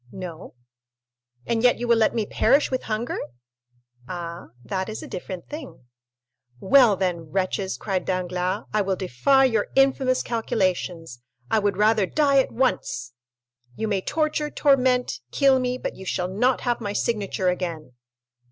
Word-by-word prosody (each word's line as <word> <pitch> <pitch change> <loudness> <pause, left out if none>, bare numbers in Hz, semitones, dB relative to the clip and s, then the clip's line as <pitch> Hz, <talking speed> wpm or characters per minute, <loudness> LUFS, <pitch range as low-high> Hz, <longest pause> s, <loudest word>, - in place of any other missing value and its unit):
"No." 180 -6 -8 0.9
"And 230 -1 0
yet 245 0 +4
you 240 - -3
will 235 - +5
let 220 - +2
me 220 -2 0
perish 280 +7 +2
with 255 - -1
hunger?" 220 +2 -2 0.9
"Ah, 170 -1 -6 0.2
that 190 -1 -3
is 215 - -6
a - - -8
different 180 -1 -7
thing." 290 - -9 0.7
"Well, 235 - +5
then, 175 -4 -2
wretches," 190 +2 -1
cried 190 -3 -2
Danglars, 185 0 -2
"I 215 - +3
will 195 -1 0
defy 195 - +3
your 225 -5 +1
infamous 265 -1 +3
calculations—I 175 - -2
would 205 -2 0
rather 210 -1 +3
die 280 +1 +3
at 265 - +1
once! 225 - -1 0.6
You 220 - -2
may 200 -3 0
torture, 305 +3 -1
torment, 260 -4 +2
kill 270 -2 +4
me, 250 0 -1
but - - -5
you 190 - -10
shall 180 -1 -1
not 245 +7 +1
have 240 -1 -1
my 205 -2 -3
signature 200 -4 0
again!" 170 -6 -4
210 Hz, 150 wpm, -24 LUFS, 185-250 Hz, 0.9 s, will